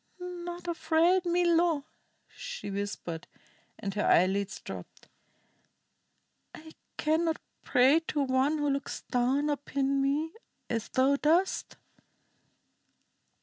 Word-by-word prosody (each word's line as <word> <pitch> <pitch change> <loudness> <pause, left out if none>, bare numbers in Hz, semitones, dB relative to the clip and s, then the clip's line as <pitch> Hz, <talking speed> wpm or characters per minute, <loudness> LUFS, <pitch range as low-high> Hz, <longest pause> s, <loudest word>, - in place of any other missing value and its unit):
"Not 350 -1 -6
afraid, 340 +2 +2
Milo," 340 -3 +2 0.4
she 485 - -7
whispered, 195 -4 -4 0.5
and 200 -3 -4
her 210 - -1
eyelids 190 +2 +2
drooped. - - -10 1.5
"I 315 +1 -12 0.3
cannot 320 +1 +1 0.2
pray 265 +6 +4
to 295 - 0
one 265 +3 +2
who 295 -1 +1
looks 275 0 -3
down 265 +4 +2
upon 275 -1 0
me 295 +4 0 0.4
as 230 -2 -2
thou 270 +2 +3
dost." 335 +6 +1
290 Hz, 100 wpm, -29 LUFS, 260-335 Hz, 1.5 s, pray